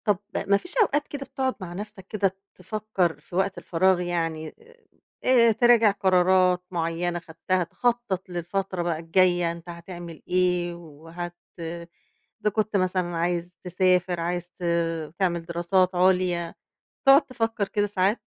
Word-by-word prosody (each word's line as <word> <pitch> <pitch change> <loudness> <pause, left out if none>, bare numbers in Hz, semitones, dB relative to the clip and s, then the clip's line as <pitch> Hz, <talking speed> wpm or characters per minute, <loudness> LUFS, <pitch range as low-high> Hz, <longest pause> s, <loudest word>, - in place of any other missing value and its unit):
طَب 210 -3 +3 0.3
ما 200 0 +5
فيش 355 - -8
أوقات 295 -8 +2
كده 275 -1 -6
بتقعد 260 0 -2
مع 175 -2 -6
نفسك 205 0 -8
كده 195 -3 0 0.2
تفكر 190 -3 -2
في 175 - -12
وقت 190 +1 0
الفراغ 185 +1 +2
يعني، 165 -3 -2 0.7
آآ 235 -3 +5
تراجع 230 -1 +5
قرارات 185 -2 +3
مُعيّنة 170 0 -1
خدتها، 175 +2 -1
تخطّط 230 0 -1
للفترة 180 +1 -3
بقى 170 -2 -1
الجاية، 175 0 +2
أنت 170 +1 -10
هتعمل 170 -1 -9
إيه، 180 -1 +1
وهت 170 +1 -8 1.1
إذا 210 - +2
كنت 215 0 0
مثلًا 185 -2 0
عايز 175 +1 -2
تسافر، 180 -1 +1
عايز 175 +1 -3
ت - - -12 0.6
تعمِل 170 -3 0
دراسات 180 +2 +1
عُليا، 180 -2 +2 0.5
تقعد 275 +2 +9
تفكّر 225 -5 -1
كده 205 0 0
ساعات؟ 195 +2 +1
180 Hz, 135 wpm, -25 LUFS, 175-200 Hz, 1.1 s, تقعد